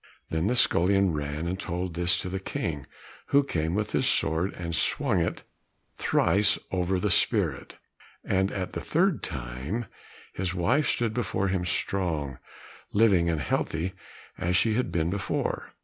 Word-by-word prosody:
Then 80 +3 0
the 125 - +1
scullion 95 -4 +3
ran 75 +2 -3
and 90 +2 -2
told 90 -1 -3
this 85 +2 +2
to - - -4
the 95 +1 -3
King, 75 -7 -4 0.4
who 140 0 +4
came 80 - -1
with 105 0 -1
his - - +1
sword 80 +4 +2
and 85 -2 -4
swung - - +1
it - - -2 0.5
thrice 105 +1 +3
over 90 0 0
the 105 +1 0
spirit, - - +1 0.5
and 95 0 +1
at 90 -2 -4
the - - -3
third 175 +1 +1
time, 65 - -4 0.5
his 90 -1 -2
wife 120 - +2
stood 115 -2 0
before 110 -5 -1
him 95 -1 -1
strong, 80 -7 -1 0.5
living, 100 -6 +4
and 80 -3 0
healthy 80 +7 -1 0.5
as 90 0 0
she 110 +4 +4
had 125 +3 0
been 85 0 0
before. 100 -1 -2
90 Hz, 155 wpm, -27 LUFS, 85-100 Hz, 0.5 s, who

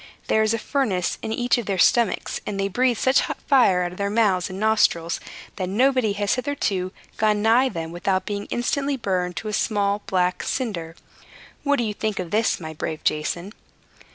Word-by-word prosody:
There 220 - +3
is 215 0 +2
a - - -1
furnace 215 -7 -1
in 220 - -4
each 245 +2 +1
of 235 - -6
their 195 -2 0
stomachs; 235 +3 +2
and 200 -1 -3
they 195 - +1
breathe 245 +4 +1
such 260 +3 +3
hot - - -2
fire 220 -10 +4
out 175 - -3
of 180 - -12
their 200 0 0
mouths 200 -4 +2
and 190 +1 -6
nostrils, 205 -6 +2 0.4
that 185 -2 -2
nobody 250 0 +2
has 205 0 0
hitherto 230 -9 -1 0.3
gone 210 -1 +2
nigh 240 +4 +4
them 165 -6 -5
without 185 +2 -1
being 205 -1 -4
instantly 275 +3 -1
burned 180 -6 -1
to 220 - -5
a 210 - -3
small, 205 -1 0
black 180 -1 +1
cinder. 175 -11 -3 0.7
What 285 0 +2
do 240 - 0
you 215 -2 -2
think 215 0 -2
of 180 -2 -4
this, 220 +2 +1
my 160 -2 -7
brave 155 0 -5
Jason?" 170 +6 -1
205 Hz, 195 wpm, -23 LUFS, 185-235 Hz, 0.7 s, fire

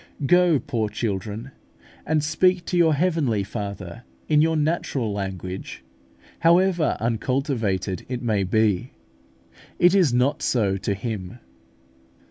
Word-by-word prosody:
Go, 175 0 +4
poor 115 -6 -2
children, 105 +3 -4 0.6
and 155 -1 +1
speak 175 +3 +2
to - - -3
your 165 -3 +4
Heavenly 145 - +1
Father 100 0 -6 0.2
in 150 -1 +4
your 160 +1 +2
natural 145 -7 -1
language: 95 -5 -6 0.6
however 170 -1 +3
uncultivated 115 - -1
it 125 -1 -4
may 105 -4 +1
be, 110 +3 +1 0.8
it 175 +1 +5
is 185 -9 +4
not 125 +4 +1
so 105 -6 +1
to 100 +1 -2
Him. 105 0 -5
120 Hz, 115 wpm, -23 LUFS, 100-160 Hz, 0.8 s, it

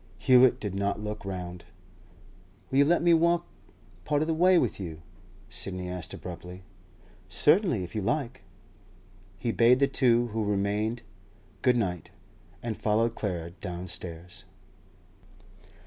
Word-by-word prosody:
Hewett 125 -1 +5
did 105 -3 -4
not 100 +1 -1
look 105 0 -5
round. 90 -2 -6 1.1
'Will 135 - +3
you 140 - +6
let 170 +2 +2
me 170 -1 +5
walk 170 +1 +3 0.6
part 145 - +1
of - - -3
the 165 - +1
way 180 +3 +5
with 125 -11 0
you?' 80 -4 -7 0.4
Sidney 90 -2 -5
asked 90 -2 -5
abruptly. 90 +1 -8 0.7
'Certainly, 150 - +3
if 90 - -8
you 110 - -2
like.' 125 +3 -2 1.0
He 115 +3 -1
bade 120 +2 +5
the 140 +1 +3
two 120 -3 +2
who 110 0 -2
remained 105 +3 -1 0.6
'Good 125 -1 +3
night,' 90 -8 -2 0.5
and 115 -2 -3
followed 115 +2 +1
Clara 85 -7 -4
downstairs. 90 -1 -6
105 Hz, 130 wpm, -28 LUFS, 90-130 Hz, 1.1 s, you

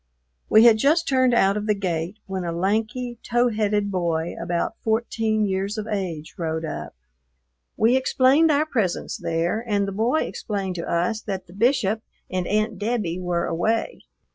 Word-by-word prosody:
We 220 - +7
had 225 -2 +7
just 310 +7 +3
turned 260 -2 +3
out 195 -2 +3
of 210 +1 -3
the 210 - +3
gate 180 0 -3
when 190 -1 -4
a 170 - -2
lanky, 220 +7 -1
tow 240 +1 +2
headed 210 -2 0
boy 170 -3 -1
about 175 -1 -1
fourteen 220 -1 0
years 195 +2 -2
of 215 - -3
age 185 -8 -4
rode 160 -1 -2
up. 75 - -6 0.8
We 230 +4 +4
explained 265 +4 +4
our 300 0 +3
presence 220 - -1
there, 170 +7 -1
and 200 -2 +1
the - - -3
boy 230 +9 +1
explained 195 -3 -3
to 170 - -4
us 180 +6 0
that 195 -3 -5
the 175 - -16
Bishop 220 -1 +1 0.3
and 185 -1 -1
Aunt 215 -1 0
Debbie 205 -6 -1
were 175 -1 -1
away. 220 - -1
210 Hz, 165 wpm, -23 LUFS, 180-230 Hz, 0.8 s, We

